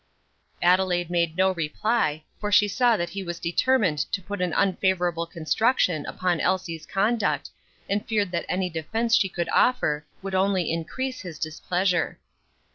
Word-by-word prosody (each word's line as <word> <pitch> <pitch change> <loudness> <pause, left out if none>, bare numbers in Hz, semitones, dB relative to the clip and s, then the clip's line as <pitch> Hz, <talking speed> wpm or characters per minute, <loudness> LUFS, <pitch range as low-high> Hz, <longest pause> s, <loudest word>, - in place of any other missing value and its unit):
Adelaide 175 -1 +2
made 170 -1 0
no 190 0 +4
reply, 165 0 -1 0.2
for 210 0 -3
she 205 0 +6
saw 235 +2 +3
that 175 -2 -3
he 200 - -4
was 175 -2 -5
determined 180 - +1
to 195 - -1
put 195 +1 -6
an 180 -2 0
unfavorable 180 -2 +1
construction 170 - +1
upon 180 -3 -1
Elsie's 170 -4 -1
conduct, 210 +2 0 0.4
and 205 +1 -1
feared 210 -4 0
that 170 -1 -2
any 185 0 0
defence 220 +8 0
she 195 - +3
could 170 -3 -3
offer 150 -12 +2 0.2
would 195 -1 -5
only 190 -2 +1
increase 255 +11 -3
his 175 -5 -8
displeasure. 175 +2 -1
185 Hz, 150 wpm, -25 LUFS, 170-205 Hz, 0.4 s, she